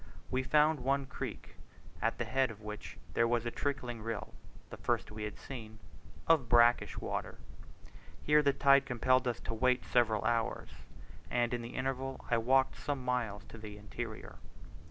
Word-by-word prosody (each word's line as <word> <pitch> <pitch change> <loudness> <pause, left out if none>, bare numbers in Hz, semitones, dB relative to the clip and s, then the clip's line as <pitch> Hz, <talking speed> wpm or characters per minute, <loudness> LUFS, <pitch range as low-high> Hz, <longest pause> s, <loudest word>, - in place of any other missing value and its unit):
We 130 - +1
found 150 +3 +3
one 135 +2 +1
creek, 135 - -7 0.4
at - - +1
the - - -1
head 130 -1 +1
of 110 -2 -10
which 105 -1 -7 0.2
there 115 - +3
was 120 0 +1
a 120 - -1
trickling 125 -5 -3
rill 110 -1 -4 0.4
(the - - -7
first - - -1
we 105 0 -5
had 105 -1 -6
seen) 110 -5 -8 0.5
of 155 -8 +4
brackish 120 0 +5
water. - - -4 0.9
Here 150 0 +5
the 140 -1 +4
tide 140 0 +5
compelled 130 +1 +2
us 120 - -1
to - - -4
wait 125 +2 +2
several 110 -4 +2
hours; 115 - 0 0.6
and 120 0 +1
in 120 - -1
the 115 +1 -8
interval 135 0 -2
I 115 - +4
walked 130 +3 +3
some 140 -3 -3
miles 120 -5 -1
into 110 - -12
the 105 -1 -8
interior. 110 +2 -7
120 Hz, 170 wpm, -33 LUFS, 115-135 Hz, 0.9 s, brackish